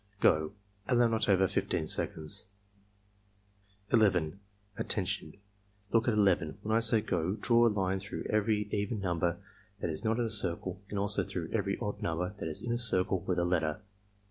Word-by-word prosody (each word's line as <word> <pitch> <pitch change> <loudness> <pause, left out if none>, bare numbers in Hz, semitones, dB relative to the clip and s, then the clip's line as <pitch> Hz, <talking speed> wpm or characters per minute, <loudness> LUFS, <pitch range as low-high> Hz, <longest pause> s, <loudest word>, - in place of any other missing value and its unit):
— - - -36
Go!" 80 +3 -1 0.3
(Allow 120 -2 +4
not 110 -1 +1
over 95 -1 +4
15 80 - -1
seconds.) 80 +2 -1 1.5
11. 95 -6 +3 0.4
"Attention! 95 -4 -2 0.5
Look 115 +1 +2
at 115 - +2
11. 90 -7 +2
When 110 +1 0
I - - +5
say 115 -1 +3
'go' 90 -2 -1
draw 120 +1 +4
a - - +4
line 95 -2 0
through 100 +2 -6
every 105 0 +1
even 105 +2 -1
number 85 -3 0 0.4
that 85 - -2
is 80 +7 -4
not 110 0 +1
in 120 - +1
a 110 - -3
circle 95 -2 0
and 105 - -4
also 100 +1 +3
through - - -4
every - - 0
odd - - -4
number 90 +3 -2
that - - -3
is 75 - -1
in 120 - -1
a 120 - -1
circle 95 -5 +2
with 90 +1 -2
a 85 - +2
letter. 80 -4 0
100 Hz, 180 wpm, -31 LUFS, 90-110 Hz, 1.5 s, I